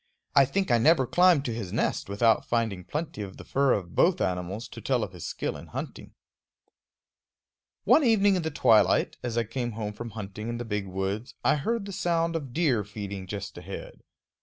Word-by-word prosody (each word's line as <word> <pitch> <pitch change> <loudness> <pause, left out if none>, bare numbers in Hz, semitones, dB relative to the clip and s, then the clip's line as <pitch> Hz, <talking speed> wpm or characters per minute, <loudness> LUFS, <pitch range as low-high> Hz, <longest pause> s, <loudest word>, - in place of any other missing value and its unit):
I 140 -1 +7
think 190 +3 -1
I 120 - +5
never 150 +1 +4
climbed 175 0 +4
to 120 - -2
his 110 -6 -5
nest - - -1
without 110 +2 +3
finding 110 -6 -1
plenty 150 - -4
of 95 -2 -7
the - - -9
fur 140 -1 +2
of 90 -4 -3
both 180 +1 +3
animals 90 +5 -2
to - - -10
tell - - +1
of - - -5
his - - -7
skill - - -3
in - - -10
hunting. - - -7 1.7
One 310 - +5
evening 205 -5 +4
in 180 - 0
the 160 - -2
twilight, 105 - +3
as 120 -1 -3
I 115 - +3
came 120 +1 -4
home 105 -1 -4
from 120 +2 -7
hunting 105 +2 -6
in 120 - -3
the 120 - -5
big 105 -3 -3
woods, 95 +5 -3
I - - +5
heard 220 +8 -1
the 200 - -7
sound 170 -1 0
of 140 -6 -4
deer 135 -8 +1
feeding 100 -2 -7
just 100 +1 -6
ahead. - - -9
115 Hz, 200 wpm, -27 LUFS, 100-160 Hz, 1.7 s, I